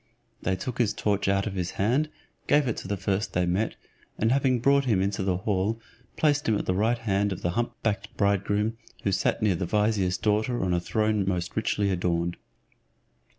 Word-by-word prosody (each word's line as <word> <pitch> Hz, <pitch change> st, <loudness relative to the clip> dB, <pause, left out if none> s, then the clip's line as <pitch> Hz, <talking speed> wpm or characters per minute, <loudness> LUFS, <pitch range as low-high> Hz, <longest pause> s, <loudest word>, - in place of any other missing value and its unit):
They 95 Hz, -, 0 dB
took 115 Hz, +7 st, -5 dB
his 115 Hz, -4 st, +2 dB
torch 100 Hz, -2 st, 0 dB
out 100 Hz, 0 st, +2 dB
of 105 Hz, -, -3 dB
his 90 Hz, -2 st, -2 dB
hand, 130 Hz, +10 st, +2 dB, 0.4 s
gave 145 Hz, -2 st, +4 dB
it 120 Hz, -, 0 dB
to -, -, -6 dB
the 100 Hz, +1 st, -1 dB
first 100 Hz, +3 st, -1 dB
they 90 Hz, 0 st, +2 dB
met, 95 Hz, +6 st, 0 dB, 0.4 s
and 110 Hz, +2 st, +2 dB
having 130 Hz, -2 st, +2 dB
brought 140 Hz, +3 st, +3 dB
him 110 Hz, -7 st, +2 dB
into 100 Hz, +2 st, 0 dB
the 95 Hz, -1 st, +1 dB
hall, 100 Hz, +3 st, 0 dB, 0.4 s
placed 145 Hz, -4 st, +2 dB
him 110 Hz, -, +3 dB
at -, -, -3 dB
the 90 Hz, -, +1 dB
right 110 Hz, +5 st, +2 dB
hand 100 Hz, -3 st, 0 dB
of 95 Hz, -, -5 dB
the 85 Hz, -, +1 dB
hump 120 Hz, +6 st, -1 dB
backed 110 Hz, -1 st, -2 dB
bridegroom, 100 Hz, +2 st, +1 dB, 0.3 s
who 100 Hz, -, +1 dB
sat 95 Hz, -, 0 dB
near 105 Hz, -3 st, +4 dB
the 85 Hz, +1 st, -2 dB
vizier's 105 Hz, -3 st, +1 dB
daughter 110 Hz, +3 st, 0 dB
on 90 Hz, -1 st, +1 dB
a 90 Hz, -, +2 dB
throne 105 Hz, +3 st, 0 dB
most 90 Hz, -2 st, -2 dB
richly 105 Hz, -2 st, +1 dB
adorned. 85 Hz, -1 st, 0 dB
105 Hz, 200 wpm, -27 LUFS, 95-110 Hz, 0.4 s, gave